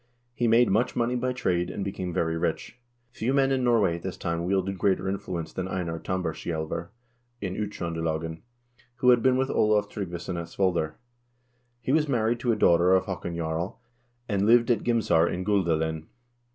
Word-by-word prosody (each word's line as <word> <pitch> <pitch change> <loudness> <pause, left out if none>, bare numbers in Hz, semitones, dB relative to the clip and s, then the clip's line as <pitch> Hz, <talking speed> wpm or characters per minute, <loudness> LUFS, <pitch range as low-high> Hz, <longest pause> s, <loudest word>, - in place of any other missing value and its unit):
He 120 0 0
made 115 0 +5
much 110 +5 +1
money 120 +1 +1
by 125 +1 0
trade, 90 -8 0
and 100 - -4
became 95 -2 -4
very 80 -1 0
rich. 85 +8 -3 0.3
Few 120 +1 -2
men 135 -1 +3
in 130 -1 +1
Norway 110 -8 +3
at - - -11
this 95 -2 -5
time 85 0 -2
wielded 95 0 0
greater 95 0 +1
influence 90 -4 -4
than 95 0 -3
Einar 85 -3 -3
Tambarskjaelver 85 -2 -3 0.5
in 95 -4 -3
Uttr0ndelagen, 80 -5 -3 0.5
who 125 0 +4
had 120 -1 +4
been 130 0 +3
with 130 +1 0
Olav 105 -1 +2
Tryggvason 90 -2 -5
at 85 - -5
Svolder. 85 -4 0 0.9
He 125 - -2
was 155 +1 +3
married 115 -2 +1
to 120 0 +1
a - - +2
daughter 90 -3 +4
of 95 0 +2
Haakon 85 -3 -4
Jarl, 85 +6 -3 0.5
and 100 -1 +1
lived 120 +1 +5
at 115 - +1
Gimsar 95 -9 +3
in 90 +1 -3
Guldalen. 80 -6 0
95 Hz, 175 wpm, -27 LUFS, 85-115 Hz, 0.9 s, made